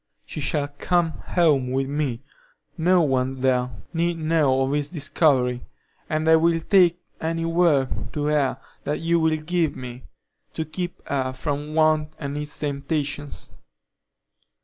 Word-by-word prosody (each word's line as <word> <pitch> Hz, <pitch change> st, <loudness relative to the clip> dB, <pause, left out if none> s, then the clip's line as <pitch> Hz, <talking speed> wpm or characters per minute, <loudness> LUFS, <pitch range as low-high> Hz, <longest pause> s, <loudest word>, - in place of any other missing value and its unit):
She -, -, -7 dB
shall 145 Hz, 0 st, 0 dB
come 175 Hz, -2 st, +2 dB, 0.2 s
home 150 Hz, -8 st, +3 dB
with 135 Hz, +1 st, 0 dB
me; 140 Hz, -4 st, -2 dB, 0.5 s
no 175 Hz, +1 st, +3 dB
one 130 Hz, -2 st, +1 dB
there 125 Hz, -1 st, +2 dB, 0.2 s
need 170 Hz, 0 st, 0 dB
know 155 Hz, -5 st, +2 dB
of 135 Hz, -, -1 dB
this 145 Hz, 0 st, 0 dB
discovery, 135 Hz, -6 st, +1 dB, 0.4 s
and 155 Hz, +1 st, 0 dB
I 160 Hz, 0 st, +7 dB
will 165 Hz, +1 st, +3 dB
take 175 Hz, -1 st, +4 dB, 0.2 s
any 165 Hz, +1 st, -1 dB
work 165 Hz, -5 st, +1 dB
to 145 Hz, -1 st, -2 dB
her 150 Hz, -3 st, +1 dB, 0.2 s
that 145 Hz, +1 st, -2 dB
you 170 Hz, +1 st, +2 dB
will 160 Hz, -1 st, +2 dB
give 165 Hz, 0 st, 0 dB
me, 125 Hz, -1 st, -8 dB, 0.5 s
to 160 Hz, -, -2 dB
keep 175 Hz, +3 st, -6 dB
her 130 Hz, -2 st, -1 dB
from 145 Hz, +3 st, -3 dB
want 155 Hz, -1 st, +3 dB
and 140 Hz, -2 st, -5 dB
its 150 Hz, 0 st, -5 dB
temptations. 145 Hz, 0 st, -3 dB
150 Hz, 145 wpm, -24 LUFS, 140-165 Hz, 0.5 s, I